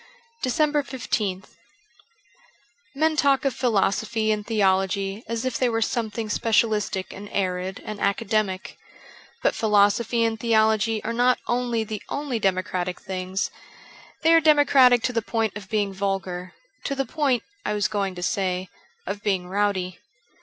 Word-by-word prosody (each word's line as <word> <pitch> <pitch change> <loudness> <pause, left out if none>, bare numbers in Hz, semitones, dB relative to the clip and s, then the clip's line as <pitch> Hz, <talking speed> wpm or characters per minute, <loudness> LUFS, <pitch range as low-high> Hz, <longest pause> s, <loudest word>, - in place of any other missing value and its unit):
387 290 +4 +2
DECEMBER 215 -8 -3
15th - - -26 1.4
MEN 315 +2 +2
talk 280 -1 +3
of 270 - +2
philosophy 220 -1 +1
and 210 -1 -2
theology 195 -1 +1
as 230 +2 -3
if 255 -3 -1
they 255 - +2
were 225 -1 0
something 225 -1 -2
specialistic 215 -3 0
and 205 +1 -9
arid 185 -1 -2
and 215 -1 -6
academic. 200 -1 -1 0.6
But - - +3
philosophy 215 +2 +3
and 225 -1 0
theology 220 -1 +2
are - - -2
not 245 +1 +3
only 240 -2 0
the 215 -1 -5
only 280 -5 -2
democratic 185 -2 -1
things, 185 0 -3 0.7
they 325 +1 +6
are 330 - +6
democratic 280 -5 +5
to 250 - 0
the 230 - +1
point 225 -1 -1
of 200 -2 -8
being 205 -3 0
vulgar, 190 -2 -3 0.3
to 275 - -1
the 270 0 -1
point, 275 -6 0 0.2
I 210 - -1
was 205 - +1
going 195 -3 -2
to 180 - -6
say, 185 -2 -1 0.4
of 205 - -4
being 190 -4 -1
rowdy. 190 -2 -1
215 Hz, 145 wpm, -24 LUFS, 195-240 Hz, 1.4 s, they